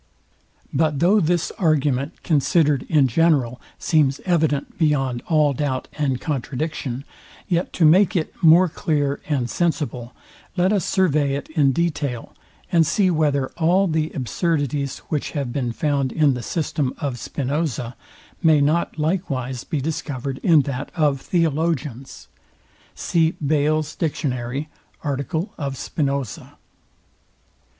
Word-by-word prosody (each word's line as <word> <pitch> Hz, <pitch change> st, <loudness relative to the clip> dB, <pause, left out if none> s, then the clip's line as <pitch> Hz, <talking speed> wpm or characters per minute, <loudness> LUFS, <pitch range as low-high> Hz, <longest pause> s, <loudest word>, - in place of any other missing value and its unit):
But 150 Hz, 0 st, +1 dB
though 185 Hz, +8 st, +4 dB
this 175 Hz, -1 st, +1 dB
argument, 150 Hz, -3 st, 0 dB
considered 150 Hz, -3 st, +2 dB
in 145 Hz, -4 st, +4 dB
general, 130 Hz, -3 st, +2 dB, 0.2 s
seems 145 Hz, -4 st, +2 dB
evident 160 Hz, -6 st, 0 dB
beyond 135 Hz, -6 st, +1 dB
all 150 Hz, -4 st, +3 dB
doubt 130 Hz, -1 st, -2 dB
and 135 Hz, -4 st, -1 dB
contradiction, 140 Hz, -1 st, -3 dB, 0.4 s
yet 175 Hz, 0 st, 0 dB
to 165 Hz, -, +3 dB
make 180 Hz, +4 st, +5 dB
it 160 Hz, -3 st, -1 dB
more 170 Hz, +2 st, +7 dB
clear 145 Hz, -3 st, -1 dB
and 135 Hz, -5 st, 0 dB
sensible, 135 Hz, -6 st, -2 dB, 0.4 s
let 185 Hz, +3 st, +3 dB
us 195 Hz, -5 st, +1 dB
survey 150 Hz, -7 st, +2 dB
it 140 Hz, -, -6 dB
in 145 Hz, -4 st, +3 dB
detail; 145 Hz, -5 st, -2 dB, 0.4 s
and 170 Hz, -3 st, +5 dB
see 185 Hz, +2 st, +2 dB
whether 145 Hz, -4 st, +1 dB
all 180 Hz, +4 st, +3 dB
the 160 Hz, -3 st, 0 dB
absurdities, 145 Hz, 0 st, -1 dB
which 150 Hz, -3 st, -2 dB
have 135 Hz, -4 st, -2 dB
been 125 Hz, -4 st, -1 dB
found 140 Hz, 0 st, 0 dB
in 150 Hz, -3 st, +3 dB
the 125 Hz, -, -4 dB
system 145 Hz, 0 st, -2 dB
of 135 Hz, -6 st, -3 dB
Spinoza, 135 Hz, -3 st, -3 dB, 0.5 s
may 160 Hz, -4 st, +5 dB
not 155 Hz, +5 st, +1 dB
likewise 140 Hz, -7 st, -2 dB
be 155 Hz, -, -3 dB
discovered 135 Hz, -2 st, -4 dB
in 160 Hz, -5 st, +4 dB
that 135 Hz, +1 st, -4 dB
of 145 Hz, -5 st, +1 dB
Theologians. 155 Hz, -6 st, -1 dB, 0.7 s
See 165 Hz, -2 st, +1 dB
Bayle's 155 Hz, 0 st, 0 dB
dictionary, 135 Hz, -3 st, -2 dB, 0.4 s
article 155 Hz, -, -2 dB
of 140 Hz, -3 st, -3 dB
Spinoza. 140 Hz, -7 st, -3 dB
150 Hz, 125 wpm, -22 LUFS, 135-165 Hz, 0.7 s, more